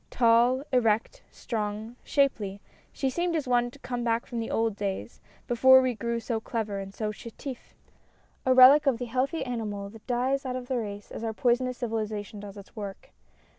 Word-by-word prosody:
Tall, 240 +2 +4
erect, 245 - +1
strong, 215 0 -4
shapely, 215 -9 +1 0.3
she 270 - -2
seemed 345 +5 0
as 300 -4 -1
one 245 -1 +2
come 245 -2 -5
back 230 0 0
from 235 - -5
the 225 - -3
old 225 -2 0
days, 200 +2 -4 0.3
before 260 +2 +7
we 255 -1 +2
all - - -7
grew 235 +1 -2
so 230 -1 -2
clever 220 -3 -3
and 195 0 -6
so 210 +1 -3
chetif^ 235 +4 -9 0.7
a 260 - +2
relic 260 +3 +8
of 260 -4 +3
the 245 - -4
healthy 260 +7 -1
animal 210 -5 -4
that 220 0 -15
dies 255 +2 0
out 255 -1 -3
of 250 -1 -6
the 260 - 0
race 205 -2 -6
as - - -6
our 225 -1 -2
poisonous 250 +2 +1
civilization 215 -2 -3
does 205 0 -9
its 200 +3 -13
work. 200 -3 -7
235 Hz, 185 wpm, -28 LUFS, 215-255 Hz, 0.7 s, relic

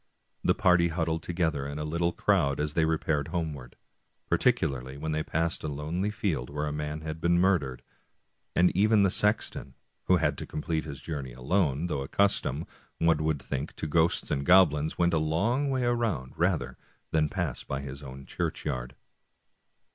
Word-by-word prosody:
The - - +3
party 90 -2 +4
huddled 80 -1 -1
together 80 -5 -1
in 70 +1 -5
a 75 - -3
little 85 +3 0
crowd 70 -4 +1
as 75 0 -1
they 80 0 +3
repaired 80 -2 0
homeward, 75 -8 -4 0.5
particularly 65 0 +1
when 80 +2 -3
they 80 0 0
passed 80 +2 -1
a - - -2
lonely 80 +7 -2
field 95 - -2
where 75 +1 -2
a 75 - -2
man 75 +1 -4
had 80 +1 -6
been 85 +1 +3
murdered, 70 -10 +1 0.7
and 90 0 +4
even 105 +2 +4
the 95 - +3
sexton, 105 +3 0 0.3
who - - +5
had - - 0
to - - -6
complete 80 +1 -2
his 70 -3 -7
journey 70 -6 -5
alone, 75 +3 0
though 80 -6 -2
accustomed, 80 -1 +1 0.3
one 80 -1 +2
would 80 -2 0
think, 70 +2 -4
to - - -4
ghosts 80 +2 +1
and 70 - 0
goblins, 80 -3 +4
went 85 0 +2
a 80 - +3
long 105 - +1
way 130 -2 0
round 115 - -1
rather 85 -1 0 0.3
than 75 -1 +2
pass 85 -8 -3
by 70 0 -4
his 70 +1 -7
own 70 -1 -9
churchyard. 65 +1 -3
80 Hz, 170 wpm, -28 LUFS, 70-85 Hz, 0.7 s, who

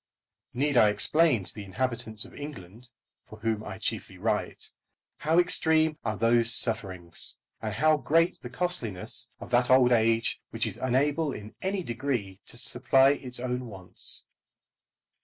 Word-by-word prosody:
Need 140 +1 +1
I 110 -3 +6
explain 125 - +3
to - - -5
the 105 - -8
inhabitants 110 +1 -2
of - - -14
England, 120 -5 -10 0.4
for 110 - -12
whom 110 -1 -2
I 95 -3 -7
chiefly - - -4
write, - - -2 0.5
how 160 +2 0
extreme 160 -3 +3
are 110 -2 -2
those 115 0 +3
sufferings, 95 -9 +1 0.3
and 110 - -3
how 155 +5 +3
great 165 +6 +1
the 125 - -8
costliness 125 - -1
of - - -10
that 125 0 +3
old 130 -1 +5
age 115 -1 +2
which - - -1
is - - -4
unable 145 +4 0
in 105 +1 -9
any 190 0 -2
degree 120 - -3
to - - -5
supply 135 +3 +3
its 125 -3 -4
own 125 0 -3
wants? 95 -4 -2
125 Hz, 150 wpm, -27 LUFS, 110-145 Hz, 0.5 s, I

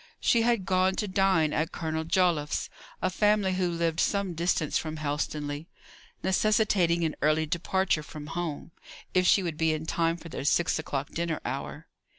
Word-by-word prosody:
She 235 - +3
had 230 -4 +1
gone 185 0 +2
to 210 - -2
dine 185 -5 +2
at 160 +2 0
Colonel 160 -1 -3
Joliffe's, 170 -4 +1 0.3
a 185 - +1
family 205 0 +2
who 185 -1 0
lived 170 -1 -1
some 200 -3 +1
distance 165 -2 0
from 155 -1 -1
Helstonleigh 150 0 -3 0.6
necessitating 190 -4 +2
an 160 -2 -1
early 155 +1 +3
departure 170 +1 0
from 150 -1 -9
home, 170 -3 -4 0.4
if 185 -1 +3
she 195 - +5
would 165 -3 -3
be 160 0 +2
in 155 0 -4
time 165 +1 0
for 165 - -11
their - - -5
six 160 +3 +2
o'clock 140 -3 -4
dinner 170 -2 -2
hour. - - -5
170 Hz, 165 wpm, -28 LUFS, 155-185 Hz, 0.6 s, she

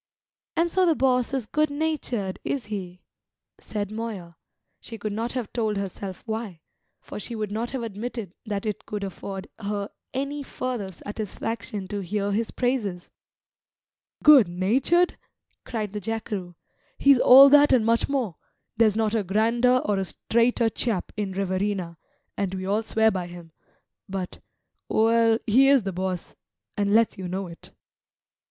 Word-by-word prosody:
"And 335 +1 +2
so 370 -1 +3
the 330 - +4
boss 250 -2 +2
is 265 -4 -2
good 305 +6 +1
natured, 285 -10 -2
is 270 -6 -2
he?" 180 -3 -6 0.6
said 205 -1 -4
Moya, 215 -7 -6 0.4
she 225 - -9
could 215 -1 -4
not 230 +3 -2
have 250 -5 -4
told 220 -3 0
herself 195 -1 -5
why; 220 -7 -4 0.4
for - - -8
she 230 +3 -6
would 215 -2 -3
not 225 +3 -2
have 260 -2 -4
admitted 225 -2 -5
that 205 0 -3
it 210 -2 -4
could 210 -1 -4
afford 195 0 -6
her 205 -1 -3 0.2
any 280 +2 -3
further 250 -7 -4
satisfaction 210 +2 -5
to 205 - -3
hear 200 +2 -2
his 220 +2 0
praises. 220 -9 -2 1.1
"Good 285 -9 +8
natured?" 245 - +2 0.5
cried 215 -4 -4
the 210 - -4
jackeroo. 205 -4 -4 0.4
"He's 275 -2 +5
all 265 +3 +10
that 290 +1 +7
and 240 -4 +4
much 230 +3 +2
more; 250 - -1 0.4
there's 215 -2 +4
not 220 -1 +1
a 225 - +2
grander 230 +6 +2
or 205 -2 +1
a 190 - -1
straighter 235 +4 +1
chap 220 -6 -2
in 205 -2 -3
Riverina, 190 -3 -2 0.4
and 195 -1 -2
we 185 0 -4
all 205 +3 +1
swear 220 0 +2
by 180 -3 -3
him; 175 -2 -11 0.6
but 190 -2 -5 0.5
well, 225 0 +4
he 255 +5 +5
is 275 -4 +5
the 195 -1 -3
boss, 185 -1 -4 0.4
and 200 -1 0
let's 225 -1 +3
you 185 - -4
know 190 +2 -3
it." 170 -2 -12
215 Hz, 155 wpm, -25 LUFS, 195-240 Hz, 1.1 s, all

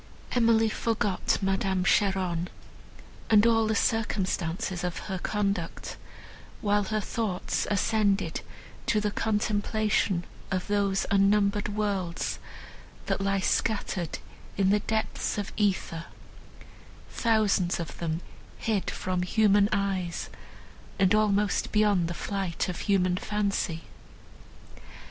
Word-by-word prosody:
Emily 230 -2 +4
forgot 215 -3 0
Madame 190 -1 +1
Cheron 185 -3 +2 0.8
and 215 -1 +6
all 225 -1 +4
the 220 - +1
circumstances 190 -5 -1
of 180 -1 -2
her 190 -1 -3
conduct, 200 -4 -2 0.6
while 205 -1 +2
her 215 +2 -1
thoughts 210 -3 -2
ascended 205 -1 +1 0.5
to 215 - +3
the 210 0 0
contemplation 210 -3 0 0.2
of 185 -1 -1
those 200 -2 +1
unnumbered 200 +1 +3
worlds, 195 -5 -1 0.7
that - - -1
lie 195 0 +1
scattered 190 -6 0 0.4
in 195 -1 +3
the 210 - +4
depths 220 +1 -2
of 205 - -4
æther, 190 -5 0 1.1
thousands 210 -6 +2
of 165 - -6
them 165 0 -2 0.4
hid 215 -4 -1
from 185 -1 -2
human 205 +2 +4
eyes, 195 -4 -1 0.7
and 190 -1 +4
almost 210 -1 +2
beyond 205 -5 +3
the 170 - -4
flight 195 -5 -2
of 180 - -4
human 185 -3 +2
fancy. 200 -5 -1
200 Hz, 110 wpm, -28 LUFS, 185-210 Hz, 1.1 s, and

